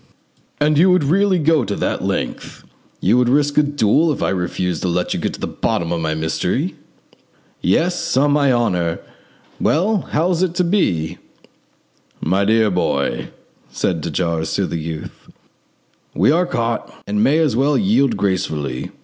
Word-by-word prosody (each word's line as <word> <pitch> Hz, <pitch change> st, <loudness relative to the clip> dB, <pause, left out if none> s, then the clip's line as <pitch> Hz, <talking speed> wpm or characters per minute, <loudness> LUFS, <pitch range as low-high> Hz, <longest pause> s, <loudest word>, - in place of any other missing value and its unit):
"And 150 Hz, 0 st, +2 dB
you 185 Hz, +3 st, +5 dB
would 180 Hz, -4 st, +3 dB
really 190 Hz, +6 st, +2 dB
go 160 Hz, -3 st, +2 dB
that 105 Hz, -, -2 dB
length? -, -, -4 dB, 0.4 s
You 110 Hz, +7 st, +3 dB
would 125 Hz, -1 st, +2 dB
risk 145 Hz, +2 st, +2 dB
a -, -, +7 dB
duel 145 Hz, +2 st, +2 dB
if 145 Hz, -, -2 dB
I -, -, +1 dB
refused 90 Hz, -2 st, -2 dB
to -, -, -1 dB
let 90 Hz, 0 st, -1 dB
you -, -, -3 dB
get -, -, -2 dB
to -, -, -13 dB
the -, -, -2 dB
bottom 85 Hz, 0 st, -2 dB
of 85 Hz, -1 st, -1 dB
my 80 Hz, -1 st, -1 dB
mystery?" 80 Hz, 0 st, -1 dB, 0.9 s
"Yes, 165 Hz, -, 0 dB
on 145 Hz, +2 st, +3 dB
my 145 Hz, -2 st, +3 dB
honour! 90 Hz, -9 st, 0 dB, 0.6 s
Well, 195 Hz, +6 st, +1 dB
how 165 Hz, +5 st, +1 dB
is 175 Hz, -1 st, 0 dB
it 180 Hz, -2 st, 0 dB
to 180 Hz, -, +2 dB
be?" 90 Hz, -, 0 dB, 1.0 s
"My 95 Hz, +5 st, +1 dB
dear 110 Hz, 0 st, +3 dB
boy," 90 Hz, 0 st, -1 dB, 0.4 s
said 85 Hz, -4 st, -2 dB
de 85 Hz, -, -4 dB
Jars 80 Hz, 0 st, -1 dB
to 100 Hz, -, +1 dB
the 85 Hz, -, -4 dB
youth, 80 Hz, -1 st, -7 dB, 0.9 s
"we 95 Hz, -, +4 dB
are 175 Hz, +3 st, +2 dB
caught, 115 Hz, -8 st, -2 dB
and 105 Hz, +1 st, 0 dB
may 145 Hz, +3 st, +3 dB
as 155 Hz, -8 st, +2 dB
well 140 Hz, +4 st, +2 dB
yield 140 Hz, -, +2 dB
gracefully. 90 Hz, -10 st, -2 dB
115 Hz, 165 wpm, -19 LUFS, -, 1.0 s, a